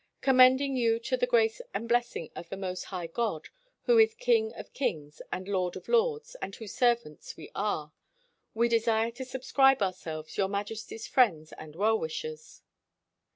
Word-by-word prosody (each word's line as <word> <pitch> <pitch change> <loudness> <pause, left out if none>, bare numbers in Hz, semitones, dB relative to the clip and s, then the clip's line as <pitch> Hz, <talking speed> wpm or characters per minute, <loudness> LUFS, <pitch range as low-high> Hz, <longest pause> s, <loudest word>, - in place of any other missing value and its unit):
' - - -55
' - - -49
Commending 260 +1 +5
you 230 -2 +2
to 230 - -1
the - - 0
grace 480 -1 +2
and 230 - -3
bless 240 +1 +1
ing 165 - -6
of 170 - -8
the 195 - -5
Most 185 -1 -4
High 180 -3 -5
God, 165 -1 -3 0.3
who 475 -1 +4
is 445 0 +5
King 455 -2 +2
of - - -10
kings 150 - -3
and 185 +1 -4
Lord 185 -3 -1
of - - -9
lords, 470 +1 +1
and 195 - -5
whose 220 -4 -9
servants 235 - 0
we - - -11
are, 160 -7 -2 0.6
We 235 +1 +3
desire 230 -1 +2
to 240 +3 -7
subscribe 265 -1 +2
ourselves, 160 -5 -5
Your 195 - +3
Majesty's 215 +2 -5
friends 170 - +2
and 155 -1 -11
well 220 +4 +2
wishers. 155 -1 -6
225 Hz, 180 wpm, -29 LUFS, 185-265 Hz, 0.6 s, Commending